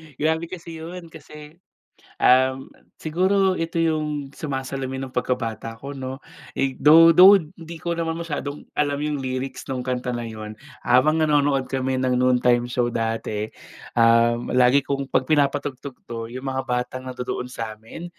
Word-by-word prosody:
Grabe 160 +4 0
kasi 165 -2 -9
'yon, 170 +1 -9
kasi 150 +2 -13 0.6
um, 130 +1 +3 0.3
siguro 190 +4 +2
ito 165 0 -1
'yong 150 -3 -1
sumasalamin 135 -2 -4
ng - - -23
pagkabata 115 -3 -2
ko, 140 0 -7
'no? 130 +1 -6 0.3
Eh, 135 -1 -1
though 165 +2 +7
though 190 +3 +10
'di 165 0 -11
ko 170 -1 -2
naman 165 -1 -1
masyadong 150 -3 -5 0.2
alam 145 -1 +1
'yong 150 -1 -1
lyrics 130 +1 -4
no'ng 130 -1 -3
kanta 125 0 -3
na 120 - -3
'yon. 110 -2 -7 0.3
Habang 130 +6 +4
nanonood 145 -4 +2
kami 130 0 -2
ng 130 -1 +1
noontime 125 -1 +2
show 120 -1 -1
dati. 110 -2 -2 0.5
Um, 115 +1 +3
lagi 125 +2 +4
kong 140 -1 -3
'pag 130 - +1
pinapatugtog 140 -2 -1
'to, 115 -1 -6
'yong 130 +2 -8
mga 130 0 -1
batang 125 +1 -2
nandodoon 125 0 -4
sa'min, 115 +6 -7
135 Hz, 150 wpm, -23 LUFS, 125-155 Hz, 0.6 s, though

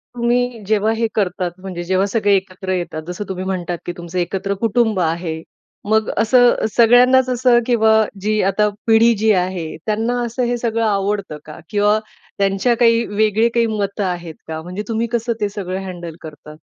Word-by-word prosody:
तुम्ही 240 0 0
जेव्हा 215 0 +2
हे 230 0 0
करतात, 185 -3 -1
म्हणजे 185 -2 -6
जेव्हा 190 +2 +1
सगळे 205 -1 +1
एकत्र 185 0 -6
येतात 175 -3 -3
जसं 180 +3 -5
तुम्ही 185 -1 -4
म्हणतात 180 -2 -3
की - - -3
तुमचं 175 +1 -5
एकत्र 195 +3 -2
कुटुंब 220 -2 +2
आहे. 165 -1 -2 0.5
मग 220 0 +2
असं 240 +2 +4
सगळ्यांनाच 250 +2 +5
असं 250 -1 +3
किंवा 220 -3 +3 0.3
जी 215 +1 +1
आता 210 +2 +2 0.2
पिढी 230 +1 +5
जी 220 +1 +3
आहे, 180 -2 -1 0.2
त्यांना 225 +3 -1
असं 240 +2 -3
हे 240 0 0
सगळं 230 -1 -1
आवडतं 200 -5 -1
का? 155 +2 -10
किंवा 210 +1 +2 0.4
त्यांच्या 195 +4 +1
काही 230 -1 +3
वेगळे 215 +2 +2
काही 235 -1 +3
मतं 205 -2 -2
आहेत 175 -3 -4
का? 160 0 -5
म्हणजे 180 +5 -6
तुम्ही 230 0 -1
कसं 235 0 0
ते 205 - +1
सगळं 190 -2 -5
हँडल 175 -3 -7
करता? 150 -1 -11
205 Hz, 170 wpm, -19 LUFS, 185-230 Hz, 0.5 s, सगळ्यांनाच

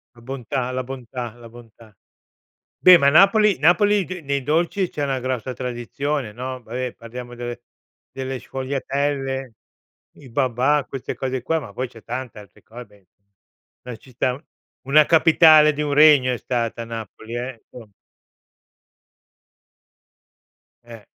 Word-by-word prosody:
La 120 - -17
bontà, 130 0 -4
la 130 0 -3
bontà, 125 -2 -7
la 120 -1 -13
bontà. 115 -2 -16 0.8
Beh, 180 -1 +8
ma 140 - +4
Napoli 195 +6 +5
napoli 190 +6 +3
ghe 180 0 -7
nei 140 -2 -2
dolci 170 +6 0
c'è 150 - -6
una 135 -2 -1
grossa 130 0 -3
tradizione, 125 +1 -4
no. 130 +2 -6
Vabbè 125 +2 -5
parliamo 120 +1 -10
delle 120 0 -6 0.5
delle 130 -1 -5
sfogliatelle, 135 0 -3 0.6
i 135 - -14
babà, 130 +3 +1
queste 135 -2 -6
cose 130 -1 -3
qua 160 +6 -1
ma - - -10
poi 130 0 -3
c'è 115 -2 -16
tanta 125 -2 -6
altre 100 -1 -19
cose, 105 -5 -14 0.7
beh 125 -2 -8
ci 130 - -19
sta. 125 +2 -2 0.4
Una 150 +3 +5
capitale 155 -2 +6
di 150 - -4
un 145 -1 -2
regno 145 -4 +6
è 125 - -3
stata 115 -1 -3
Napoli 115 0 -8
eh. 120 -1 -6
Insom 115 -4 -13 2.9
Eh. 115 -3 -13
130 Hz, 135 wpm, -22 LUFS, 120-145 Hz, 2.9 s, Beh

